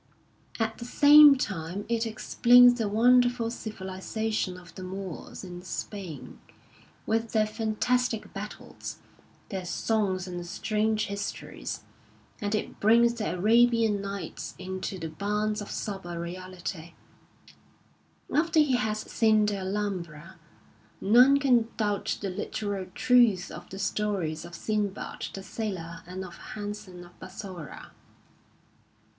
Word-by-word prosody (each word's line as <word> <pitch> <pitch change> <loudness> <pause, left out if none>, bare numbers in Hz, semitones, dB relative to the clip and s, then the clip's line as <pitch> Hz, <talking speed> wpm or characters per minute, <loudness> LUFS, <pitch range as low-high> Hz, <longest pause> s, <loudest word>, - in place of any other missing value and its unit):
At 225 0 -1
the 235 - -6
same 290 +3 +8
time 190 -3 -3
it 230 0 0
explains 245 +2 +5
the 215 -3 0
wonderful 245 +1 +4
civilisation 210 -1 -3
of 175 -2 -14
the - - -9
Moors 185 -1 -7
in 175 -1 -8
Spain, 185 -4 -7 0.7
with 225 +1 -1
their 215 -1 +4
fantastic 225 +2 -1
battles, 210 +1 -7 0.5
their 190 -2 -4
songs 190 0 0
and 175 -1 -5
strange 215 +3 0
histories; 200 0 -5 0.6
and 205 +1 0
it 210 - -4
brings 235 +3 +5
the 215 -6 -2
Arabian 225 +1 +4
Nights 200 -2 -6
into 190 +1 -5
the 165 -2 -4
bounds 210 +5 -1
of 205 - -7
sober 185 -5 -5
reality: 175 -1 -6 1.4
after 325 +1 +3
he 280 -5 +4
has 215 -2 -1
seen 215 -2 +3
the 205 -1 0
Alhambi*a 190 -4 -4 0.6
none 250 +7 +6
can 250 -5 +3
doubt 205 -2 0
the 195 -2 -2
literal 200 0 -3
truth 240 -7 +4
of - - -9
the 190 - -8
stories 190 -5 -1
of 170 0 -9
Sinbad 205 +1 -3
the 195 - -7
Sailor 180 -7 -5
and 185 +1 -6
of 175 -2 -11 0.2
Hasan 205 -4 -6
of 175 - -19
Bassorah. 185 -5 -9
205 Hz, 120 wpm, -28 LUFS, 185-225 Hz, 1.4 s, same